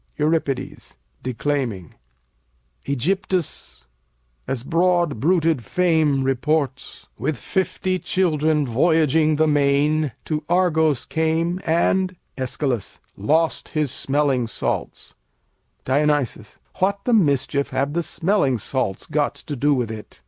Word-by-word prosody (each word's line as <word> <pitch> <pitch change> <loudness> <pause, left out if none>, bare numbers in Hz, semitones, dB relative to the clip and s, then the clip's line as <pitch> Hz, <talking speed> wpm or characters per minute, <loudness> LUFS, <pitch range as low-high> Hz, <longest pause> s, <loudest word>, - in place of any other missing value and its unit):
Eur. 150 +1 +2 0.9
[declaiming] 125 - -2 0.9
Ægyptus, 175 - -2 0.6
as 125 -3 -3
broad 170 -3 +1
bruited 160 -3 +2
fame 160 - +2
reports, 135 +1 -1
With 145 +1 -1
fifty 185 - -1
children 155 -5 +1
voyaging 155 +4 +3
the 155 +1 +3
main 145 0 +2
To 155 -1 -2
Argos 160 -6 +2
came, 165 +3 0
and 180 +3 +1 0.2
Æsch. 130 -3 -2 0.2
lost 155 +11 0
his 150 -4 +1
smelling 135 -4 +1
salts. - - -3 0.7
Dion. 145 +1 +2 0.5
What 200 +2 +1
the 245 - +1
mischief 140 - +2
have 140 +2 -1
the 170 - +1
smelling 165 - +1
salts 115 -3 -2
got 150 -1 0
to 145 - -7
do 145 +3 +2
with 120 -4 -2
it? 110 -1 -9
150 Hz, 105 wpm, -22 LUFS, 135-165 Hz, 0.9 s, voyaging